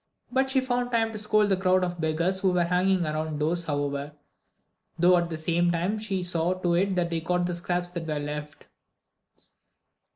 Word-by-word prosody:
But 265 +1 +1
she 265 0 +2
found 245 -1 -1
time 225 -2 +1
to 215 - -5
scold 210 0 +2
the 195 - +3
crowd 185 0 +2
of 175 -1 -3
beggars 170 +4 0
who 190 -1 +2
were 175 -1 +3
hanging 180 +1 +2
around 155 0 -2
the 150 - 0
doors 170 +1 -1
however, 145 -1 -2 0.8
though 175 +2 +5
at 175 -1 +1
the 160 - -4
same 170 +2 +1
time 180 +6 -1
she 195 -4 -2
saw 175 0 0
to 180 -2 0
it 190 +2 +1
that 175 -1 0
they 165 -1 -1
got 180 +2 0
the 175 - -2
scraps 175 +1 -2
that 170 -2 -5
were 155 -1 -1
left. 150 +1 -6
175 Hz, 200 wpm, -26 LUFS, 165-190 Hz, 0.8 s, though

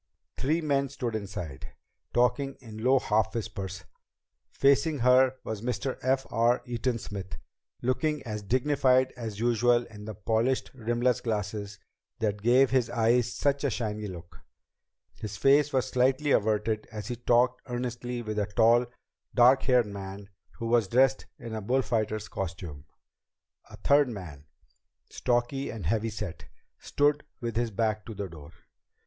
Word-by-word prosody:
Three 155 +6 0
men 140 -3 +1
stood 125 -4 -4
inside, 100 -9 -6 0.4
talking 135 +3 +1
in 110 -3 -10
low 130 +2 +5
half 110 -3 +1
whispers. 95 -4 -5 0.7
Facing 140 +3 +3
her 125 +1 +5
was 110 -2 -5
Mr. 125 +2 -3
F. 130 +1 +1
R. 120 +2 +2
Eaton 120 0 -1
Smith, 100 -3 -7 0.5
looking 150 +4 0
as 105 -3 -5
dignified 130 +3 +2
as 110 -4 -6
usual 120 +1 +3
in 105 -2 -11
the 110 -1 -6
polished 115 +6 0
rimless 120 0 0
glasses 105 -2 -3 0.4
that 105 -2 -1
gave 125 +4 +4
his 130 -3 +2
eyes 120 +1 +2
such 140 0 0
a 140 - +2
shiny 105 -3 -3
look. 85 -3 -10 0.8
His 105 -1 -6
face 145 +1 +4
was 130 -2 0
slightly 130 +3 +2
averted 110 0 +1
as 105 +2 -6
he 120 - -2
talked 120 +1 +2
earnestly 120 0 -4
with 110 -1 -3
a 105 - 0
tall, 115 +3 +4 0.5
dark 125 +2 +6
haired 125 -3 +3
man 100 0 -8 0.3
who 115 - -5
was 115 -3 +3
dressed 130 +4 +3
in 115 -4 -8
a 110 - -3
bullfighter's 110 -2 0
costume. 85 -6 -6 0.8
A - - -11
third 145 -1 +4
man, 80 - -8 0.7
stocky 125 +3 0
and 105 -7 -6
heavy 110 +6 0
set, 105 -5 -6 0.3
stood 145 0 +1 0.2
with 115 -2 -4
his 120 0 0
back 110 0 -1
to 110 - -7
the 100 -1 -4
door. 80 -3 -12
120 Hz, 145 wpm, -28 LUFS, 105-130 Hz, 0.8 s, dark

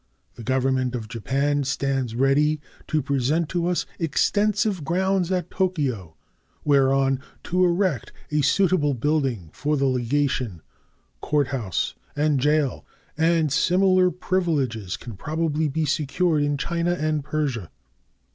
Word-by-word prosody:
The - - -11
Government 130 0 0
of 115 -3 -5
Japan 140 +5 0
stands 135 -3 -1
ready 145 +4 +3 0.3
to 155 -2 0
present 140 +4 0
to 175 -1 -1
us 180 -1 0
extensive 205 +4 +1
grounds 185 +3 0
at 180 -2 -1
Tokyo 140 - -1 0.5
whereon 135 -1 +3 0.2
to 180 +1 +1
erect 175 - +1 0.2
a 150 0 +2
suitable 150 -1 +2
building 130 - -1
for 150 +1 -1
the 140 - +1
legation, 125 - 0 0.6
court 145 -3 +1
house, 115 -11 -2 0.2
and 150 -1 +2
jail, 150 0 +1 0.3
and 160 -1 +2
similar 185 +2 +4
privileges 150 - -1
can 120 -4 -9
probably 155 - -1
be 155 +2 -1
secured 155 +2 +1
in 145 0 0
China 170 +4 -1
and 155 -3 -1
Persia. 140 - -2
145 Hz, 125 wpm, -24 LUFS, 130-170 Hz, 0.6 s, similar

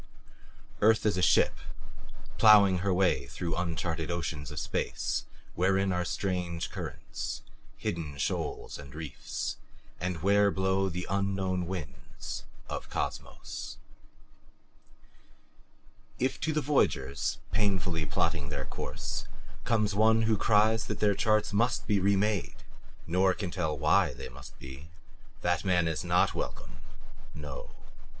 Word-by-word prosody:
Earth 110 +1 +5
is 105 - +3
a 90 - 0
ship, - - +4 0.8
plowing 100 -4 +7
her 100 +2 +1
way 90 0 +2
through 85 -2 -3
uncharted 85 -2 -2
oceans 80 -4 -3
of 75 - -4
space - - -1 0.3
wherein 95 +1 +2
are 90 0 0
strange 90 -2 -2
currents, - - -5 0.3
hidden 75 -4 -3
shoals 70 - -2
and 70 -1 -10
reefs, 75 -5 -4 0.4
and 90 -3 -3
where 100 +1 +5
blow 95 0 +1
the 90 +1 -4
unknown 95 -2 0
winds 85 -9 -6 0.2
of - - -5
Cosmos. - - -4 2.4
If 130 - 0
to 160 - 0
the 155 0 +1
voyagers, 70 - +1
painfully 90 -6 +1
plotting 80 -5 0
their 75 - -3
course, - - -4 0.4
comes 105 -3 +2
one 110 +2 +4
who 110 0 +3
cries 110 +1 +3
that - - -3
their 105 -1 +4
charts 110 0 +2
must 115 +3 +2
be 105 -2 +2
remade, 100 +1 +1 0.4
nor 90 +2 +3
can 95 -4 -4
tell 80 -5 -1
WHY 75 +2 +3
they - - -7
must - - -12
be 65 +4 -10 0.5
that 90 -2 +1
man 90 -3 +3
is 80 -2 -1
not - - +3
welcome - - -5 0.6
no! 75 -3 -7
95 Hz, 125 wpm, -30 LUFS, 80-100 Hz, 2.4 s, plowing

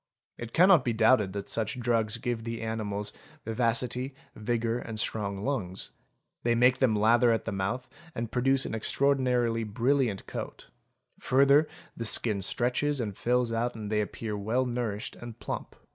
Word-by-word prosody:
It 120 -1 -6
cannot 180 -2 +6
be 120 - 0
doubted 110 -3 +4
that 100 -1 -5
such 110 +2 -2
drugs 115 -2 +1
give 120 -1 -3
the 115 0 -4
animals 105 -2 -3 0.3
vivacity, 125 +3 0 0.2
vigour, 115 +1 -1
and 110 -3 -5
strong 100 -3 -2
lungs; 100 -10 -3 0.5
they 120 0 +2
make 125 +2 +4
them 120 -5 +3
lather 115 +3 +4
at 110 -3 0
the - - -2
mouth, 100 +7 -2 0.3
and 115 -1 -4
produce 135 +2 +2
an - - -4
extraordinarily 125 -1 +1
brilliant 120 0 0
coat; - - -7 0.5
further 140 +3 +4 0.3
the 115 - -4
skin 110 -2 +1
stretches 125 +8 0
and 105 -5 -3
fills 125 +1 +1
out 115 +1 -1
and 105 -2 -6
they 105 0 +2
appear 105 +1 -4
well 110 +6 0
nourished 120 -4 -3
and 120 -2 -9
plump. - - -5
115 Hz, 160 wpm, -28 LUFS, 110-125 Hz, 0.5 s, cannot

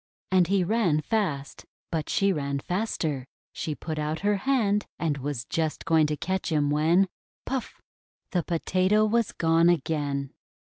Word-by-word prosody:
And 185 -2 +4
he 195 0 +2
ran 180 -6 +2
fast; 150 -7 -2 0.3
but 160 -3 -2
she 195 -1 +2
ran 140 -3 -2
faster. 155 - -2 0.3
She 155 - -3
put 155 0 -5
out 150 +1 -2
her 205 +1 +2
hand, 210 -4 +1
and 150 -4 -1
was 135 -3 -3
just 160 -2 -2
going 160 -2 +4
to 150 0 -2
catch 190 +1 -2
him, 145 -2 +2
when 165 +6 +3 0.2
— - - -79
puff! 265 -3 -4 0.5
the 180 -5 +1
Potato 185 +5 +2
was 230 0 +1
gone 165 +1 +3
again. 145 -4 0
165 Hz, 155 wpm, -27 LUFS, 150-195 Hz, 0.5 s, And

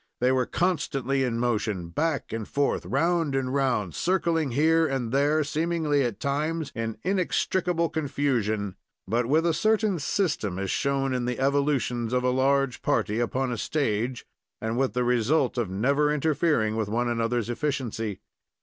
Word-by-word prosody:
They 125 +1 +3
were 130 -1 +1
constantly 140 -7 0
in 120 -3 -1
motion, 110 -7 -1
back 150 - -1
and 110 -2 -4
forth, 145 0 0
round 165 0 +1
and 130 -1 -1
round, 125 - 0
circling 170 -4 +1
here 160 +5 +3
and 130 -5 -2
there, 145 +3 +2
seemingly 155 -1 0
at 120 -5 -2
times 150 +4 -1
in 115 -1 -3
inextricable 180 -2 0
confusion, 120 - -1 0.3
but 115 +4 0
with 155 +5 +3
a 170 - +3
certain 215 0 +1
system, 145 - -1
as 95 -1 -2
shown 135 -1 0
in 125 -1 -1
the 125 0 -2
evolutions 135 -4 0
of 125 0 +1
a 125 - +2
large 135 0 +1
party 105 +2 0
upon 125 +2 -1
a 120 - -3
stage, 125 -4 -1 0.3
and 110 +1 -2
with 130 +1 0
the 125 0 +1
result 125 +3 +2
of 115 -6 -1
never 140 +10 +2
interfering 150 -7 +1
with 110 -2 -1
one 120 +3 0
another's 115 -1 0
efficiency. 120 -7 -3
135 Hz, 160 wpm, -26 LUFS, 115-150 Hz, 0.3 s, They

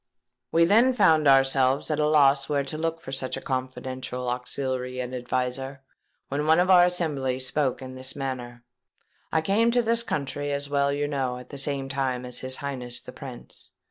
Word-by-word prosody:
"We 165 0 +5
then 230 +8 +5
found 160 - +4
ourselves 135 +1 +3
at 155 - 0
a 150 - +3
loss 140 -2 +4
where 145 -1 +1
to 140 - -6
look 165 +1 -2
for 135 - -8
such 135 -1 -3
a - - -4
confidential 130 -1 -4
auxiliary 125 0 -3
and 125 0 -4
adviser; 130 +2 -3 0.4
when 145 +2 -2
one 160 +2 +5
of 185 +1 +3
our 175 -1 +8
assembly 150 -8 -1
spoke 130 +1 -1
in 130 0 -8
this 130 0 -5
manner:—'I 125 +2 -6
came 210 +7 +2
to 245 0 +2
this 230 +1 +1
country, 145 -6 -3
as 140 0 -1
you 140 - -11
well 140 0 +2
know, 140 -3 -1
at 125 0 -11
the 140 - -7
same 135 -1 -1
time 130 -2 -2
as 125 0 -2
his 130 0 -1
Highness 125 -4 -3
the - - -11
Prince. - - -11
135 Hz, 185 wpm, -26 LUFS, 130-150 Hz, 0.4 s, our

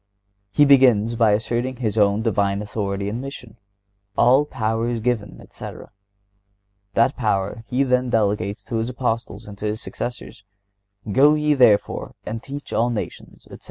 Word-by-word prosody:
(126) - - -24
He 145 - +7
begins 125 -6 +5
by 110 -2 +4
asserting 120 +4 -1
His 115 -4 -2
own 105 0 +2
Divine 100 -2 0
authority 100 -2 -3
and 110 +4 -3
mission. 125 -5 -9 0.6
"All 130 +4 +5
power 115 -4 -2
is 120 -1 -2
given," 110 -3 -2
etc. - - -10 1.0
That 115 +4 +3
power 105 -1 -1
He 130 +2 +1
then 125 -1 +1
delegates 105 -3 0
to 115 - -4
His 115 +2 -1
Apostles 115 -3 -3
and 100 -1 -10
to - - -4
their 105 0 0
successors: 120 -1 -7 0.7
"Go 145 +7 +5
ye, 150 0 +2
therefore, 120 -7 +2
and 110 +1 -5
teach 140 +2 -8
all 120 +2 +2
nations," 115 -3 -6
etc. - - -12
115 Hz, 160 wpm, -22 LUFS, 105-125 Hz, 1.0 s, He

